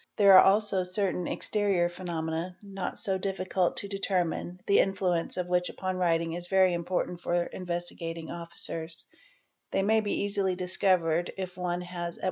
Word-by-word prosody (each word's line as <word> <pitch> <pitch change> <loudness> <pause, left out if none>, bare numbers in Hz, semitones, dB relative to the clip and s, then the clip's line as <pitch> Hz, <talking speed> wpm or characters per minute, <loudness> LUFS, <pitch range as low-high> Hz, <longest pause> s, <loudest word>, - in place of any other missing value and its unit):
'There 200 -2 +7
are 185 - +10
also 200 -1 +3
certain 180 -1 -1
exterior 200 -5 +1
phenomena, 175 0 -4
not 195 -2 -5
so 190 -1 0
difficult 185 -1 -1
to 200 - -2
determine, 180 -3 -1
the 200 - +4
influence 185 -4 +1
of 180 - -1
which 180 0 +1
upon 185 0 -3
writing 165 -2 +1
is 175 +1 -3
very 190 -1 +4
important 175 0 -2
for 175 0 +1
Investigating 170 -2 -5
Officers"®?. 165 -1 -6 0.6
They 195 - 0
may 220 +2 +4
be 205 -1 -1
easily 200 -2 0
discovered 180 -2 +1
if 185 -1 -5
one 180 -1 -2
has 175 -1 -5
at. - - -16
180 Hz, 155 wpm, -29 LUFS, 175-195 Hz, 0.6 s, are